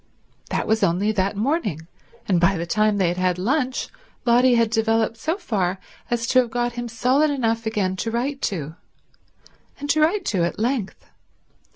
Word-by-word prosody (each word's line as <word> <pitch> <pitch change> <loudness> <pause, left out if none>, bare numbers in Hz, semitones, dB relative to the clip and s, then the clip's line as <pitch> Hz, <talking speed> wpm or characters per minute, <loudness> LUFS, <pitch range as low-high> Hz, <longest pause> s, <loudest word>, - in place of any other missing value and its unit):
That - - -1
was 220 0 +1
only 185 +6 +2
that 200 -1 0
morning; 210 - -1 0.4
and 180 -4 +2
by 190 +2 +3
the 170 - -3
time 215 +3 +1
they 185 -3 +2
had 175 - -3
had 185 -1 +1
lunch 255 +6 -1 0.4
Lotty 245 +1 +5
had 230 -2 +2
developed 225 0 +1
so 320 +10 -2
far 190 - -1 0.3
as 235 -1 0
to 255 - +5
have 245 -2 +1
got 240 +1 -1
him 240 0 -4
solid 255 +6 +2
enough 230 -5 -1
again 195 -4 0
to 225 - -2
write 265 +5 -2
to, 160 -6 -5 1.1
and 290 0 -1
to 310 - +2
write 350 +5 +2
to 185 -5 0
at 170 - -2
length. 230 -3 -2
225 Hz, 180 wpm, -22 LUFS, 190-250 Hz, 1.1 s, Lotty